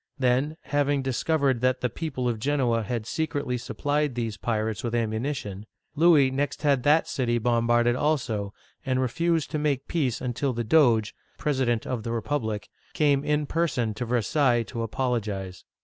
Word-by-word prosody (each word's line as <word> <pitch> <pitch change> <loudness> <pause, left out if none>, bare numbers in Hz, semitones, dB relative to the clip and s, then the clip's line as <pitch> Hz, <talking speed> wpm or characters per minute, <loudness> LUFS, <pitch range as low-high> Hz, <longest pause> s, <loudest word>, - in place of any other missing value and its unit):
Then, 135 +4 +1
having 145 -1 +1
discovered 135 -1 +1
that 130 0 +1
the 125 - +2
people 130 -1 -3
of 115 -3 -1
Genoa 125 -3 +1
had 115 0 -3
secretly 145 -2 -2
supplied 145 +2 -1
these 115 -3 -2
pirates 110 -2 -2
with 120 -1 -2
ammunition, 110 -3 -3 0.3
Louis 150 -4 +5
next 145 +3 -2
had 140 -3 +3
that 150 +5 +3
city 120 -3 0
bombarded 120 0 +2
also, 120 -9 -1 0.3
and 130 -3 0
refused 165 +5 0
to 155 - -1
make 140 -3 -1
peace 135 -8 0
until 125 +2 -2
the 120 0 -2
Doge 115 -5 +3 0.2
(president 130 -6 0
of 125 -3 -3
the 115 - -4
republic) 110 -3 -2 0.3
came 145 -2 +2
in 150 0 +1
person 135 -9 0
to 120 +4 -4
Versailles 120 +1 +2
to 115 +1 -6
apologize. 110 -6 -3
125 Hz, 155 wpm, -26 LUFS, 115-145 Hz, 0.3 s, Louis